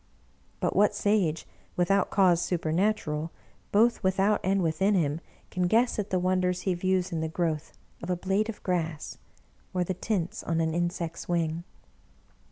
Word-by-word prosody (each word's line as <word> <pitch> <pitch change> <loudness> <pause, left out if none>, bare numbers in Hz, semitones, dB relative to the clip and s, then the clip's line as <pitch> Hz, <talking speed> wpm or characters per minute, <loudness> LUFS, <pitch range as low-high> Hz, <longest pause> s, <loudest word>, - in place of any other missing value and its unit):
But - - -1
what 205 +1 +4
Sage, 200 -7 +1 0.3
without 185 +2 +2
cause 180 -4 +4
supernatural, 165 -2 0 0.4
both 230 +4 +4
without 195 +2 +2
and 190 0 +2
within 190 +6 +2
him, 155 -2 0 0.3
can 180 -1 0
guess 230 +5 +2
at 205 0 -2
the 185 - +1
wonders 180 0 +1
he 190 - 0
views 185 +1 0
in 165 -2 -2
the 160 - -1
growth 160 -2 -2 0.3
of 170 - -6
a 180 - +2
blade 195 +4 0
of 225 - -7
grass, 165 -4 -2 0.6
or 180 - +2
the 185 - -2
tints 185 -2 -2
on 165 0 -1
an 160 -1 +1
insect's 170 -1 -3
wing? 165 -1 0
180 Hz, 160 wpm, -28 LUFS, 165-195 Hz, 0.6 s, what